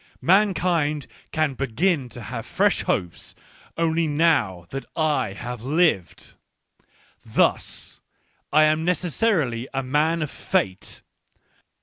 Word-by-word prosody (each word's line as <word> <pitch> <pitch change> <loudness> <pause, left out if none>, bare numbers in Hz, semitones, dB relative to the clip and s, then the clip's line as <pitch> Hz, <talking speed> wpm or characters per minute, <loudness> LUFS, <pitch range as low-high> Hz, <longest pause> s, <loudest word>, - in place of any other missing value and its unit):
Mankind 175 -6 +2 0.3
can 155 -3 +1
begin 135 +3 0
to 120 0 -9
have 115 +1 -5
fresh - - +2
hopes, 90 -2 -3 0.4
only 165 0 +1
now 145 - +2
that 135 0 -4
I 145 -10 +1
have 120 +2 -6
lived. 145 - 0 0.9
Thus, - - 0 0.5
I 155 +1 +6
am 155 +1 +3
necessarily 170 - 0
a 135 - 0
man 155 +5 +1
of 150 - -5
Fate. 95 -1 -2
150 Hz, 105 wpm, -24 LUFS, 125-165 Hz, 0.9 s, I